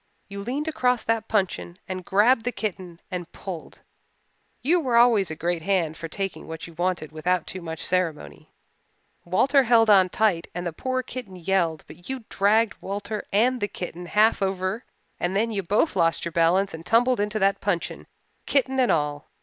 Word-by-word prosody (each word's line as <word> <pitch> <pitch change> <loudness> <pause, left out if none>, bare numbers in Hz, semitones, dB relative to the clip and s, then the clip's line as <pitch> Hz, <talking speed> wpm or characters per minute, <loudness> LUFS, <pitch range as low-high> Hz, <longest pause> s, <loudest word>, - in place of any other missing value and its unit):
You 200 0 -7
leaned 260 +9 -3
across 250 -6 +1
that 225 0 0
puncheon 190 -4 -1
and 185 -1 -5
grabbed 220 +6 +3
the 245 - -1
kitten 185 -7 -5
and 180 -2 -5
pulled. 180 -5 -8 0.8
You 340 +7 +3
were 255 -7 0
always 235 -5 +5
a 160 - -4
great 170 +1 -1
hand 170 -3 0
for 165 - -6
taking 195 +3 -5
what 160 0 -7
you 170 - -12
wanted 175 -2 -2
without 175 +2 0
too 185 - -7
much 160 -1 -5
ceremony. 155 - -2 0.8
Walter 265 +11 +4
held 230 -3 +4
on 190 -2 +6
tight 195 -5 +1
and 175 0 -4
the 170 - -3
poor 255 +7 -2
kitten 245 -7 -8
yelled 175 -3 0
but 175 - -14
you 265 -3 -4
dragged 210 +2 +2
Walter 205 +2 -4
and 245 +5 +2
the 205 - +1
kitten 175 -2 -7
half 215 +3 +3
over 190 +3 -1 0.3
and 175 +2 -1
then 225 +3 +1
you 200 -2 -1
both 205 - +1
lost 165 0 +1
your 170 - -3
balance 175 +4 +2
and 160 0 -7
tumbled 245 +5 +3
into 210 +1 -1
that 195 -1 +2
puncheon, 180 -4 -2 0.4
kitten 265 -1 +1
and 250 - +4
all. 145 -2 -1
195 Hz, 180 wpm, -25 LUFS, 175-225 Hz, 0.8 s, on